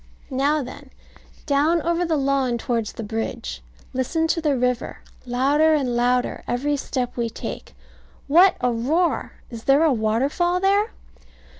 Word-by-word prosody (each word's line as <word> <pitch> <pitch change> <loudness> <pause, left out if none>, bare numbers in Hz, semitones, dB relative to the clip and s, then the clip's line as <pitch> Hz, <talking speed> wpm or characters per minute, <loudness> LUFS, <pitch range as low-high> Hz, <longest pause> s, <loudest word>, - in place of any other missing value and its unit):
Now 280 +3 +1
then, 265 +2 -10 0.6
down 300 +4 +2
over 340 +1 +1
the 325 -2 0
lawn 270 -3 +1
towards 230 -2 -2
the 230 - -6
bridge. 205 - -4 0.3
Listen 260 +6 0
to 330 - +1
the 295 -4 +1
river, 250 -1 -1 0.3
louder 285 +6 +3
and 260 -5 0
louder 245 +1 +1
every 285 +4 0
step 255 -3 -3
we 235 -1 -1
take. 225 - -7 0.5
What 350 +6 +6
a 250 0 +2
roar! 300 +10 0 0.2
Is 230 -1 -8
there 275 +3 +5
a 315 -4 +4
waterfall 270 +11 +1
there? 400 +3 +2
270 Hz, 145 wpm, -23 LUFS, 245-315 Hz, 0.6 s, What